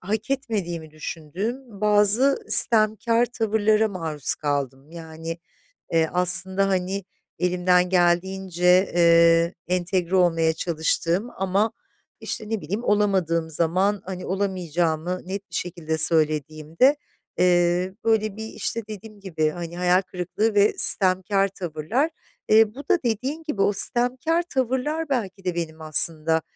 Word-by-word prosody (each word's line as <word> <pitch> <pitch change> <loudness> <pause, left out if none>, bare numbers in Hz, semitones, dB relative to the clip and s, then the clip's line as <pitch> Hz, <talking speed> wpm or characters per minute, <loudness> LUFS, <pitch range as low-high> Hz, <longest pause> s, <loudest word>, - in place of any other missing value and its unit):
hak 215 +6 -4
etmediğimi 195 - -4
düşündüğüm 195 - -7
bazı 210 +6 +3
sitemkâr 225 +1 +4
tavırlara 220 -2 0
maruz 160 -7 -1
kaldım. 140 -1 -4
Yani, 165 0 -8 0.6
eee, 160 -1 +2
aslında, 185 +2 +2
hani, 190 +1 -2 0.4
elimden 180 0 +1
geldiğince, 180 +1 +1
eee, 170 0 +4
entegre 180 0 -1
olmaya 165 -3 +2
çalıştığım 170 +5 -2
ama, 195 +4 0 0.5
işte, 215 0 -4
ne 220 -3 -3
bileyim, 200 +10 -5
olamadığım 190 -7 0
zaman, 185 +6 0
hani, 185 -1 -7
olamayacağımı 175 -3 -2
net 195 +1 -6
bir - - -7
şekilde 165 -3 -4
söylediğimde, 155 - +2 0.4
eee, 180 +1 +1
böyle, 215 -2 0
bir, 220 - -6
işte, 230 +1 -3
dediğim 215 0 -11
gibi, 160 -6 -2
hani, 170 +1 -8
hayal 180 +1 +2
kırıklığı 190 +4 -3
ve 205 +1 +3
sitemkâr 195 +1 +5
tavırlar. 190 - -3 0.4
Eee, 215 0 +4
bu - - -10
da 370 -3 +3
dediğin 260 +8 -3
gibi 300 -11 -4
o 205 - +2
sitemkâr 255 - +1
tavırlar 280 +2 -2
belki 200 -7 -3
de 180 -2 -3
benim 160 -2 -5
aslında, 160 +1 +4
185 Hz, 120 wpm, -23 LUFS, 170-215 Hz, 0.6 s, sitemkâr